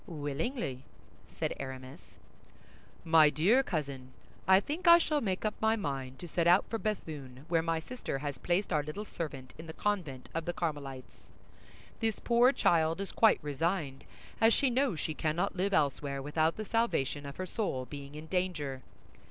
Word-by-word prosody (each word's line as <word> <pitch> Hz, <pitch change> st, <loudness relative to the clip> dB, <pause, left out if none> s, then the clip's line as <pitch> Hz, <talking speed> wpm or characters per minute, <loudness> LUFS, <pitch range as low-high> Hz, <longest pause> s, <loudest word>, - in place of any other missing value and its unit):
"Willingly," 145 Hz, -, -3 dB, 0.5 s
said -, -, -1 dB
Aramis. 130 Hz, -1 st, -7 dB, 1.1 s
"MY 160 Hz, -2 st, +7 dB
DEAR 195 Hz, -, +4 dB
COUSIN, 140 Hz, -, -4 dB, 0.3 s
I 190 Hz, 0 st, +7 dB
think 310 Hz, -, -4 dB
I 340 Hz, 0 st, +11 dB
shall 305 Hz, -3 st, +1 dB
make 190 Hz, -2 st, -2 dB
up 215 Hz, -, +1 dB
my 220 Hz, 0 st, +3 dB
mind 135 Hz, -9 st, -4 dB
to 175 Hz, -, -8 dB
set 170 Hz, +1 st, 0 dB
out 180 Hz, +3 st, +6 dB
for 225 Hz, -, -3 dB
Béthune, 145 Hz, -, -4 dB
where 165 Hz, -1 st, +3 dB
my 165 Hz, 0 st, 0 dB
sister 240 Hz, -, -5 dB
has 140 Hz, -2 st, -4 dB
placed 180 Hz, +5 st, 0 dB
our 150 Hz, -, +3 dB
little 155 Hz, +9 st, -6 dB
servant 135 Hz, -9 st, -6 dB
in 165 Hz, -, -8 dB
the 160 Hz, -, -7 dB
convent 165 Hz, -12 st, -2 dB
of 165 Hz, -1 st, -2 dB
the 175 Hz, -, -2 dB
Carmelites; 140 Hz, -7 st, -5 dB, 0.7 s
this 225 Hz, -2 st, 0 dB
poor 240 Hz, +2 st, +4 dB
child 165 Hz, -, +2 dB
is 195 Hz, -, -4 dB
quite 225 Hz, -2 st, +5 dB
resigned, 145 Hz, -1 st, -2 dB, 0.4 s
as 225 Hz, 0 st, +6 dB
she 270 Hz, -3 st, +2 dB
knows 250 Hz, -, +1 dB
she 160 Hz, -, -2 dB
cannot 165 Hz, +6 st, -1 dB
live 190 Hz, +2 st, 0 dB
elsewhere 140 Hz, -4 st, +1 dB
without 155 Hz, +3 st, +1 dB
the 215 Hz, -, -4 dB
salvation 200 Hz, -, 0 dB
of 140 Hz, -, -7 dB
her 185 Hz, -, -3 dB
soul 175 Hz, -, -2 dB
being 140 Hz, +1 st, -9 dB
in 155 Hz, +1 st, -7 dB
danger. 160 Hz, -7 st, -2 dB
165 Hz, 170 wpm, -31 LUFS, 140-205 Hz, 1.1 s, I